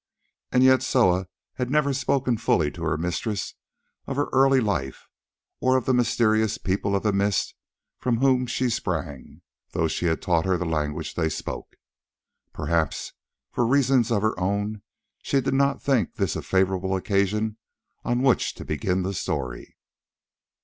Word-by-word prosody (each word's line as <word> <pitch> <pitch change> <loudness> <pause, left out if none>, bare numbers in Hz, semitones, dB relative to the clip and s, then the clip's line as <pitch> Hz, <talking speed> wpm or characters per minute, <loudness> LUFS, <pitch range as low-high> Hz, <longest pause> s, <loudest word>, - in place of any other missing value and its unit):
As 125 - +4
yet 130 -1 +6
Soa 95 -9 +2 0.3
had 125 -1 -2
never 140 0 +2
spoken 130 -1 +1
fully 80 -9 +1
to - - -11
her - - 0
mistress 90 +5 -3 0.5
of 135 - -3
her 145 +1 0
early 135 0 +5
life 85 - -2 0.5
or 130 0 +3
of 130 - -2
the 130 - +2
mysterious 110 -3 +2
People 100 +1 -1
of 100 - -1
the 105 -2 +1
Mist 100 -1 +1 0.5
from 120 -2 0
whom 130 0 +2
she 125 +1 0
sprang, 80 - -4 0.3
though 80 - +1
she 85 +2 -1
had 80 - +1
taught 85 -2 +1
her 95 -1 +2
the 90 - -3
language 75 -1 -2
they 80 -2 0
spoke. - - -6 0.8
Perhaps, 85 -3 -1 0.4
for - - 0
reasons 130 -1 +3
of 105 -2 +1
her 110 - +2
own, 100 +3 -1 0.4
she 140 - +1
did 130 - -1
not 140 +1 +1
think 130 -9 +1
this - - -1
a - - -3
favourable 95 0 +1
occasion 105 +3 0 0.5
on 120 +1 0
which 130 -3 +2
to - - -9
begin 90 +5 -1
the 95 +2 -2
story. 65 -8 -4
105 Hz, 160 wpm, -25 LUFS, 90-125 Hz, 0.8 s, yet